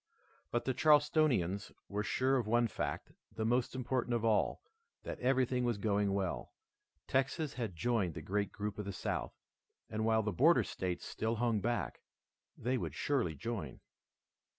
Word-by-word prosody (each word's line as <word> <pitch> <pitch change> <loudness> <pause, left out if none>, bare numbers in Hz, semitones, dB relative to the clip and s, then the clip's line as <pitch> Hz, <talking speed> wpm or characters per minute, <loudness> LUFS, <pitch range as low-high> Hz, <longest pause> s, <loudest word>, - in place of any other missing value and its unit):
But 120 - -1
the 130 - +1
Charlestonians 145 - +3 0.2
were 105 +1 -2
sure 130 +5 +2
of 120 -4 -1
one 120 +1 +3
fact, - - -4 0.2
the 110 - -1
most 120 +2 +1
important 125 -1 0
of 115 -1 0
all, 110 - +2 0.4
that - - -5
everything 125 -1 +2
was 120 -3 +1
going 100 -1 +1
well. 95 -3 -2 0.5
Texas 135 +3 0
had 115 -8 -4
joined 95 -2 0
the 80 - -5
great 100 +4 -1
group 105 0 -4
of 105 - -3
the 100 - -4
South, - - -3 0.6
and 110 0 -1
while 110 0 +3
the 105 - 0
border 160 +10 +5
states 90 -2 -3
still 110 +1 -1
hung 115 -1 +1
back, 120 -2 -2 0.6
they 125 +2 0
would - - -4
surely 120 - 0
join. 100 - -4
115 Hz, 160 wpm, -34 LUFS, 100-130 Hz, 0.6 s, border